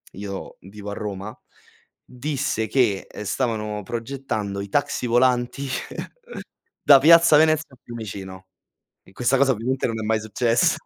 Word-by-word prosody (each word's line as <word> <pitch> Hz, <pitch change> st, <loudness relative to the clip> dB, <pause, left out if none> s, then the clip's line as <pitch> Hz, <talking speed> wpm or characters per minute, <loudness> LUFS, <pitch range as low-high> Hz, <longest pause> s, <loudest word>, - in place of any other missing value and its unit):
io 100 Hz, 0 st, -7 dB
vivo 100 Hz, +2 st, -9 dB
a -, -, -4 dB
Roma, 100 Hz, 0 st, -6 dB, 0.7 s
disse 135 Hz, -3 st, -2 dB
che, 115 Hz, -8 st, +1 dB
ehm, 105 Hz, -, -8 dB
stavano 105 Hz, -2 st, -2 dB
progettando 115 Hz, -4 st, -4 dB
i 100 Hz, -, -7 dB
taxi 125 Hz, 0 st, -1 dB
volanti 125 Hz, +3 st, +1 dB, 1.2 s
da 140 Hz, -2 st, +8 dB
piazza 165 Hz, +2 st, +7 dB
Venezia 155 Hz, -2 st, +2 dB
a -, -, -30 dB
Fiumicino, 95 Hz, -5 st, -8 dB, 0.6 s
e -, -, -20 dB
questa 125 Hz, +5 st, +1 dB
cosa 135 Hz, 0 st, +4 dB
ovviamente 130 Hz, +3 st, -1 dB
non 115 Hz, -1 st, -3 dB
è 110 Hz, -, -4 dB
mai 110 Hz, 0 st, +1 dB
successa. 115 Hz, +2 st, +1 dB
115 Hz, 140 wpm, -23 LUFS, 105-135 Hz, 1.2 s, da